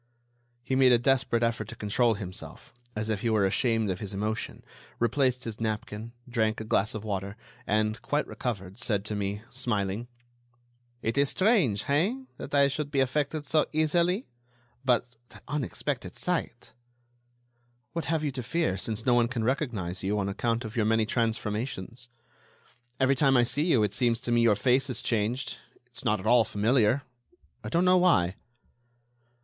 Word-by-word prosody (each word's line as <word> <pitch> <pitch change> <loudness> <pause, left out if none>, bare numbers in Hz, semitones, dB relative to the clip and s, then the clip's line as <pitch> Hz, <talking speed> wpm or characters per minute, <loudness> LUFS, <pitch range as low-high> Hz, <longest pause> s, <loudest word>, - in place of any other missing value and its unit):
He 130 +2 -1
made 130 -1 +6
a 120 - +7
desperate 120 -1 +2
effort 115 -2 0
to 115 - -8
control 110 +2 +1
himself, 95 -3 -8 0.2
as 110 +1 -2
if 105 -3 -2
he 115 - 0
were 110 -3 +3
ashamed 115 0 +1
of 90 - -4
his 100 -1 -6
emotion, 110 +3 -3 0.3
replaced 125 +1 +1
his 115 -2 -6
napkin, 110 +1 -3
drank 110 -2 0
a - - -4
glass 105 -1 +1
of 110 - -5
water, 100 -1 -4 0.3
and, 110 +1 +1
quite 145 +1 0
recovered, 100 -4 -5
said 105 -4 -1
to 105 - -3
me, 100 +1 -3
smiling: 115 -3 -1 1.0
"It 115 +5 0
is 140 -1 +3
strange, 185 - +2
hein, 195 - 0
that 145 - -5
I 140 0 +6
should 140 +1 -3
be 140 -2 0
affected 145 +3 0
so 155 0 +2
easily, 170 - +2 0.6
but 125 -2 +1
that - - -14
unexpected 145 0 -3
sight—" - - -3 1.2
"What 165 -3 -3
have 160 -1 0
you 145 - 0
to 130 -1 -5
fear, 125 - -1
since 110 +2 -3
no 125 - +4
one 120 -1 +4
can 120 -2 -3
recognize 110 - -1
you, 100 +2 0
on 100 -1 0
account 115 +4 -1
of 110 +2 -7
your 110 -3 +2
many 110 0 +3
transformations? 115 0 -2 0.9
Every 130 0 +4
time 135 -1 +4
I 120 - +5
see 145 +6 0
you 130 -11 +4
it 105 -1 0
seems 120 -1 +1
to 120 - -3
me 120 0 +4
your 115 -3 +5
face 130 +6 +2
is 125 - -3
changed; 115 +3 -1 0.3
it's 120 -1 -10
not 110 -4 +2
at - - -9
all 120 +1 +6
familiar. 115 +5 +2 0.6
I - - -4
don't 175 +2 +2
know 185 0 +6
why." 130 - +3
120 Hz, 175 wpm, -28 LUFS, 105-135 Hz, 1.2 s, a